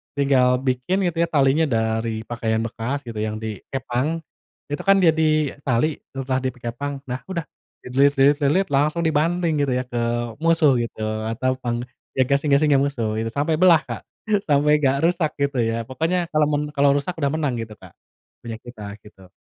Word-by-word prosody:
tinggal 130 -3 +3
bikin 135 +9 0
gitu 165 - -9
ya 170 - +3
talinya 145 +1 +3
dari 110 -1 -1
pakaian 115 -1 -2
bekas 120 +5 -3
gitu 115 -3 -8
yang 110 0 -2
dikepang. 125 - -3 0.5
Itu 145 - -2
kan 195 -1 +5
jadi 155 -3 +2
tali 140 +4 +1 0.2
setelah 130 -1 -1
di 130 - -2
pi 125 - -20
kepang. 135 +4 -4
Nah 125 - -3
udah, 170 -4 -3 0.4
dililit 140 +3 +3
lilit-lilit 145 +6 +3
langsung 150 +4 +2
dibanting 160 +1 +1
gitu 130 - -1
ya 125 - 0
ke 125 -1 -4 0.4
musuh 160 -4 +4
gitu 115 -2 -4 0.3
atau 130 +3 -1
pang 120 -1 -2 0.3
ya 130 - +4
gasing-gasing 140 +1 +3
musuh 120 -6 -1
gitu. 115 - -2
Sampai 155 +4 0
belah, 170 -4 +6
Kak. - - -6 0.5
Sampai 150 +1 +4
nggak 135 -1 +2
rusak 170 -3 -1
gitu 140 -2 0
ya. 115 0 0
Pokoknya 165 +5 -1
kalau 155 -1 +3
mun 145 -1 0
kalau 140 -1 +3
rusak 155 +5 -2
udah 140 -1 +1
menang 145 -6 -1
gitu, 115 -1 -6
Kak. - - -15 0.5
Punya 115 - -4
kita 105 -4 -9
gitu. 95 -3 -17
140 Hz, 175 wpm, -22 LUFS, 120-155 Hz, 0.5 s, belah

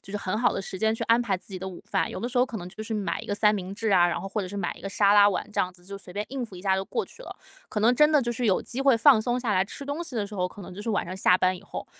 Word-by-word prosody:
就 - - -12
是 - - -1
很 200 0 -2
好 240 - +3
的 - - -3
时 190 - -6
间 220 +1 +2
去 - - -4
安 230 +1 +4
排 210 -6 0
自 180 - -14
己 190 -2 -6
的 190 +1 -5
午 180 - -10
饭。 - - 0
有 - - -6
的 240 - -2
时 250 - -1
候 250 - +4
可 230 - -6
能 175 - -7
就 215 - -8
是 220 +1 -4
买 205 -2 -2
一 - - -11
个 205 - -1
三 210 0 +4
明 190 -1 -5
治 220 0 -2
啊， 175 -2 +6
然 170 - -1
后 - - -6
或 210 +1 -2
者 185 - -4
是 205 - -7
买 195 - -2
一 - - -14
个 195 - -5
沙 200 0 +3
拉 205 0 +7
碗 195 - -2
这 - - +1
样 180 - -1
子， 175 -1 -22
就 200 +1 -8
随 180 -2 -11
便 205 +2 -3
应 260 -2 -4
付 200 - -14
一 180 - -10
下 190 -1 +2
就 190 - -2
过 455 - -2
去 - - -13
了。 - - -9 0.3
可 210 - -2
能 235 +4 +4
真 300 +4 +5
的 300 -3 +4
就 240 - -1
是 240 0 -1
有 190 - +2
机 245 - -5
会 270 -3 +5
放 230 0 +6
松 240 +2 0
下 240 -4 -1
来 185 -1 +3
吃 275 +8 -9
东 285 +4 -3
西 330 -6 -9
的 220 -3 0
时 210 - -10
候， 180 -2 0
可 200 +2 -12
能 180 - -9
就 190 - -8
是 210 - -6
晚 205 - 0
上 185 - -6
下 185 -1 +4
班 185 0 +2
以 185 - -11
后。 - - -7
205 Hz, 420 characters per minute, -26 LUFS, 190-235 Hz, 0.3 s, 拉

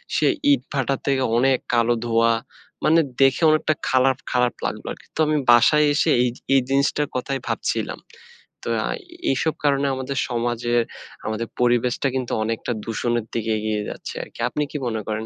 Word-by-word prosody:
সেই - - +3 0.2
ইটভাটা 135 - -1
থেকে 135 -1 +1
অনেক 130 +1 +3 0.2
কালো 120 0 +3
ধোঁয়া। 115 0 +3 0.5
মানে, 165 +2 +5 0.2
দেখে 135 +4 +4
অনেকটা 155 0 +2 0.2
খারাপ, 130 0 +3
খারাপ 125 -2 +2
লাগলো - - -4
আরকি। - - -11
তো - - -7
আমি 155 0 +2
বাসায় 150 +6 +6
এসে 155 +2 +2
এই, 125 - +2 0.2
এই 135 - +5
জিনিসটার 140 +1 +1
কথাই 135 +2 -2
ভাবছিলাম। - - -2 0.6
তো - - -4 0.6
এইসব 155 +4 0
কারণে 140 0 +2
আমাদের 130 +1 -4
সমাজের, 120 0 0 0.4
আমাদের 110 +1 -2
পরিবেশটা 120 +2 +2
কিন্তু 130 -2 -2
অনেকটা 115 +2 -3
দূষণের 120 0 -1
দিকে 115 -1 -1
এগিয়ে 105 -1 -1
যাচ্ছে - - -7
আরকি। - - -14
আপনি 150 +4 -1
কি 150 - -3
মনে 110 -2 -2
করেন? 110 +1 -3
125 Hz, 155 wpm, -22 LUFS, 115-140 Hz, 0.6 s, বাসায়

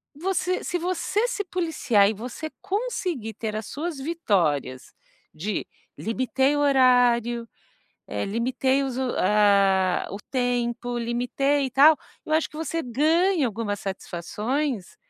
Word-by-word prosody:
você 365 +3 -1
se 355 - -1
você 370 +6 0
se 410 - -2
policiar 315 - +2
e - - -1
você 245 +8 -6
conseguir 370 - -3
ter 215 0 -4
as 215 0 -4
suas 320 +1 -4
vitórias 185 - -1 0.4
de: 200 +7 -3 0.3
limitei 260 +5 0
o - - 0
horário, 245 -4 +3 0.8
limitei 260 +5 +1
os 260 -2 -3
o 260 -2 -1
ah, 195 -2 +3 0.2
tempo, 245 -1 -1
limitei 250 +4 0
e - - -6
tal, 295 +5 +7 0.3
eu 310 - -3
acho 315 0 +2
que - - -12
você 325 +1 -2
ganha 315 +6 +2
algumas 215 -2 -3
satisfações, 210 - -3
250 Hz, 125 wpm, -25 LUFS, 220-310 Hz, 0.8 s, tal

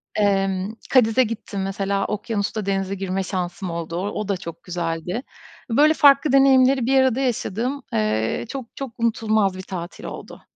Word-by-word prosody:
Emm, 195 -1 +1 0.2
Cádiz'e 250 -1 +5
gittim 210 -4 -4
mesela, 195 0 -1
okyanusta 210 0 -2
denize 195 0 -1
girme 190 0 -2
şansım 180 -1 -4
oldu. 170 0 -4 0.2
O 210 - -4
da 200 -2 0
çok 170 -2 -9
güzeldi. 175 +5 -3 0.5
Böyle 295 +7 +5
farklı 285 -1 +5
deneyimleri 265 -1 +5
bir 265 +2 +4
arada 260 -1 +2
yaşadığım, 250 +1 -2
eee, 110 - 0
çok 270 -3 -5
çok 270 -3 -5
unutulmaz 220 -4 +1
bir - - -5
tatil 175 -2 -7
oldu. - - -8
200 Hz, 150 wpm, -22 LUFS, 185-250 Hz, 0.5 s, Cádiz'e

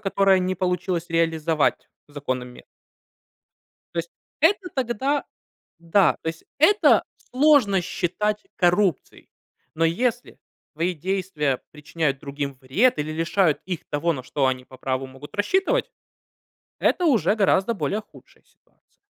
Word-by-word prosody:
которое 195 -1 +3
не 185 0 -1
получилось 180 -1 -1
реализовать 165 -2 +1 0.2
законами. 130 -4 -5 1.3
То 170 - -4
есть 170 0 -3 0.3
это 365 +4 +3
тогда 265 +3 -1 0.5
да, 170 +4 +3
то - - -3
есть 160 0 -6
это 405 +8 +5 0.3
сложно 255 -8 +4
считать 210 +5 -2
коррупцией. 180 -2 +1 0.5
Но 165 - +1
если 240 +9 -1 0.4
твои 170 +3 -1
действия 170 -5 -1
причиняют 150 -2 -2
другим 140 -1 -4
вред 170 - +2
или 150 +1 -2
лишают 165 0 +1
их 180 -3 -3
того, 165 +3 0
на 130 - -6
что 130 +2 0
они 130 -1 -1
по 130 - -15
праву 130 +1 -2
могут 135 +2 -13
рассчитывать- 385 - +1 0.9
это 360 - +1
уже 210 - +3
гораздо 200 +2 +2
более 195 +4 -2
худшая - - -20
ситуация. - - -37
175 Hz, 125 wpm, -23 LUFS, 150-210 Hz, 1.3 s, это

